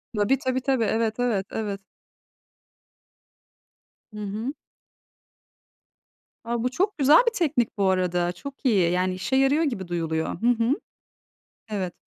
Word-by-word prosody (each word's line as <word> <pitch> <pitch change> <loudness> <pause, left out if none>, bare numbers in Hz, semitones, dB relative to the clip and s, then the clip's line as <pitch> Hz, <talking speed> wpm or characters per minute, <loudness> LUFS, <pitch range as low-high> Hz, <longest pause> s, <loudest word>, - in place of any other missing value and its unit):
Tabii, 210 +6 +2
tabii, 260 -1 -1
tabii. 260 -2 +1
Evet, 220 +1 0
evet, 225 -6 0
evet. 205 -3 -3 2.3
Hı 210 - -7
hı. 215 +6 -4 1.9
A, 235 0 -2
bu 250 - +1
çok 390 +8 0
güzel 290 +2 +6
bir 470 - +3
teknik 290 - 0
bu 195 -1 +2
arada. 180 -1 +1
Çok 280 +8 -10
iyi 190 -9 +3
yani, 185 +1 +1
işe 185 +8 -2
yarıyor 270 +4 +3
gibi 215 - -2
duyuluyor. 165 0 -2
Hı 235 - +2
hı. 240 +1 +3 1.0
Evet. 190 -4 -3
225 Hz, 130 wpm, -25 LUFS, 190-265 Hz, 2.3 s, güzel